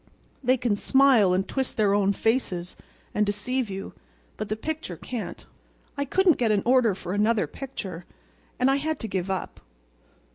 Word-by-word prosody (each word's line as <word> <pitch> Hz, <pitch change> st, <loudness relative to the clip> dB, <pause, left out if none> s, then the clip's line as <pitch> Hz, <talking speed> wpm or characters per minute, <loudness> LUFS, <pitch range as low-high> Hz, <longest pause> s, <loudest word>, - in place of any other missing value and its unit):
They 255 Hz, +1 st, +3 dB
can 235 Hz, -3 st, +1 dB
smile 255 Hz, -4 st, +4 dB
and 185 Hz, +1 st, +1 dB
twist 265 Hz, -1 st, -2 dB
their 205 Hz, -2 st, +3 dB
own 200 Hz, -1 st, +3 dB
faces 195 Hz, -5 st, -1 dB, 0.4 s
and 210 Hz, -, +2 dB
deceive 215 Hz, +4 st, -1 dB
you, 195 Hz, 0 st, -6 dB, 0.4 s
but 215 Hz, -, -5 dB
the 215 Hz, -, 0 dB
picture 295 Hz, -, -5 dB
can't. 240 Hz, +7 st, -6 dB, 0.5 s
I 280 Hz, -1 st, -1 dB
couldn't 365 Hz, +3 st, +3 dB
get 235 Hz, -3 st, +2 dB
an 205 Hz, -2 st, +2 dB
order 240 Hz, -5 st, +4 dB
for 180 Hz, -1 st, -5 dB
another 210 Hz, +2 st, +2 dB
picture, 190 Hz, -10 st, -7 dB, 0.5 s
and 255 Hz, +2 st, +3 dB
I 275 Hz, -, +3 dB
had 310 Hz, +1 st, -2 dB
to 225 Hz, -, -3 dB
give 190 Hz, -2 st, -2 dB
up. 190 Hz, -1 st, -3 dB
220 Hz, 170 wpm, -26 LUFS, 195-260 Hz, 0.5 s, smile